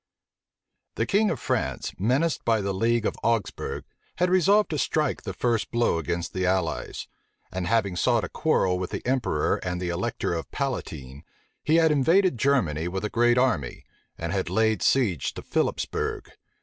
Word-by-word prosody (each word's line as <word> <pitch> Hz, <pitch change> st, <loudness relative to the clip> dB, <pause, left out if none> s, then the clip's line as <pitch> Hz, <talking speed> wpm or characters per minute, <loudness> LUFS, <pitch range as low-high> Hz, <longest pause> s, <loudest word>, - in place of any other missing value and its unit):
The -, -, 0 dB
king 210 Hz, +1 st, +2 dB
of -, -, -2 dB
France, -, -, -2 dB
menaced 130 Hz, -, +1 dB
by 115 Hz, -1 st, +2 dB
the 100 Hz, 0 st, -2 dB
league 115 Hz, +3 st, +1 dB
of -, -, 0 dB
Augsbourg, 115 Hz, -4 st, -1 dB, 0.3 s
had 180 Hz, +1 st, +1 dB
resolved 195 Hz, +3 st, +4 dB
to 150 Hz, -, -1 dB
strike 150 Hz, 0 st, 0 dB
the -, -, -5 dB
first 115 Hz, -5 st, 0 dB
blow 120 Hz, -8 st, +1 dB
against 85 Hz, +2 st, -3 dB
the 95 Hz, -, -2 dB
allies; 90 Hz, -3 st, -1 dB, 0.4 s
and 90 Hz, -1 st, -3 dB
having 110 Hz, -5 st, +1 dB
sought 120 Hz, +4 st, +2 dB
a -, -, -4 dB
quarrel 95 Hz, -, +1 dB
with 90 Hz, -, -3 dB
the -, -, -5 dB
emperor 125 Hz, -, +1 dB
and 90 Hz, -1 st, -4 dB
the 90 Hz, -1 st, -3 dB
elector 90 Hz, -2 st, -2 dB
Palatine, 75 Hz, -, -4 dB, 0.4 s
he 155 Hz, -, +2 dB
had 165 Hz, -1 st, +5 dB
invaded 165 Hz, -, +3 dB
Germany 90 Hz, -, +1 dB
with 95 Hz, +3 st, -3 dB
a 105 Hz, -, -3 dB
great 120 Hz, +1 st, +3 dB
Army, 115 Hz, -, 0 dB, 0.3 s
and 85 Hz, +2 st, -3 dB
had 95 Hz, -1 st, -1 dB
laid 110 Hz, -4 st, +1 dB
siege 105 Hz, -, +1 dB
to -, -, -7 dB
Philipsbourg. -, -, -2 dB
115 Hz, 165 wpm, -26 LUFS, 90-135 Hz, 0.4 s, had